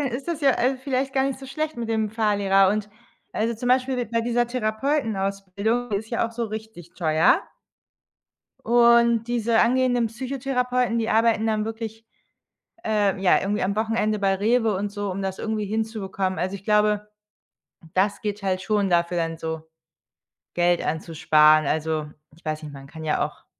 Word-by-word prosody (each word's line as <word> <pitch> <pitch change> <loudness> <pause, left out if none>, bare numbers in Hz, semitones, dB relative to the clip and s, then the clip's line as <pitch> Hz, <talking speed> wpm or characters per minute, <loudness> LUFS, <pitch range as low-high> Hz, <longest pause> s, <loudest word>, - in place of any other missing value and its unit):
dann 280 - 0
ist 250 +5 -5
das, 320 -3 -3
äh, - - +2
ja 260 0 +3
vielleicht 265 0 -2
gar 265 - +3
nicht 270 -1 -2
so 270 - -10
schlecht 310 +1 -3
mit 230 -1 -4
dem 220 -2 0
Fahrlehrer 200 -3 +3
und 210 0 -2 0.4
also, 230 +2 -1
zum 245 +3 -4
Beispiel 255 -1 +1
bei 230 +1 -1
dieser 240 0 +1
Therapeutenausbildung, 220 -3 -1
die 200 - +1
ist 220 +3 -6
ja 230 -1 0
auch 230 - -10
so 235 0 -2
richtig 215 -6 -9
teuer 160 -2 +3 1.2
und 235 -1 +5
diese 235 -1 +1
angehenden 245 -1 +2
Psychotherapeuten, 250 0 -1
die 225 - -1
arbeiten 225 0 +3
dann 215 -1 0
wirklich, 225 0 -6 0.8
äh, 205 -3 +1
ja, 185 - +4
irgendwie 205 +2 -1
am 200 +2 -1
Wochenende 215 -1 0
bei 195 -1 +2
REWE 225 +2 +2
und 200 +2 -3
so, 205 -2 -3
um 195 +2 -4
das 190 -1 -3
irgendwie 215 -1 -2
hinzubekommen. 205 -3 -2
Also, 190 +2 -2
ich 195 - -11
glaube, 210 0 +2 0.8
das 200 +2 +1
geht 210 -1 -4
halt 185 -1 0
schon 205 -1 0
dafür 175 0 +1
dann 165 -1 -2
so 160 -1 -4 0.9
Geld 175 0 +2
anzusparen. 155 -1 +3
Also, 155 -1 -1 0.3
ich 170 - -23
weiß 155 0 -3
nicht, 150 -1 -8
man 135 0 -11
kann 160 +2 -10
ja 150 - +1
auch - - -11
215 Hz, 175 wpm, -24 LUFS, 190-235 Hz, 1.2 s, und